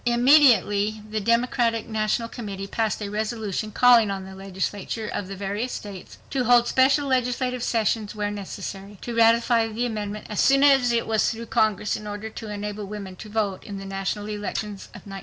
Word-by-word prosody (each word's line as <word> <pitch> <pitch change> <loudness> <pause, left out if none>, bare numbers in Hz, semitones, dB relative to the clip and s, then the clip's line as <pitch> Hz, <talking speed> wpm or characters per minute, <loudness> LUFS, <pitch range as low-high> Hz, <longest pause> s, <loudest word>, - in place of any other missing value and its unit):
Immediately 235 -5 +4
the 215 - -1
Democratic 235 +1 +1
National 220 +1 -1
Committee 200 -5 -6
passed 220 +1 -1
a 200 - -4
resolution 215 -1 -3
calling 240 -2 +5
on 195 -1 -4
the 190 - -10
legislatures 195 +3 -4
of 195 - -3
the 195 - -6
various 205 +5 -3
states 200 -3 -8
to 260 -3 0
hold 240 0 +5
special 275 +3 +3
legislative 250 -1 0
sessions 220 -2 0
where 205 -1 -2
necessary, 200 0 -7
to 240 - -5
ratify 230 0 +4
the 225 +2 -2
amendment 210 -2 -4
as 210 - -4
soon 275 0 +5
as 270 -4 +5
it 235 -1 +1
was 220 -2 +2
through 230 0 -5
Congress, 210 -2 +1
in 210 - -7
order 205 +1 -6
to 220 0 -8
"enable 210 0 -5
women 200 -2 -7
to 215 - -10
vote 205 -3 -2
in 200 - -7
the 195 - -7
national 195 +1 -3
elections 210 -1 -4
of - - -14
1920." 195 -1 -7
215 Hz, 185 wpm, -24 LUFS, 205-235 Hz, -, calling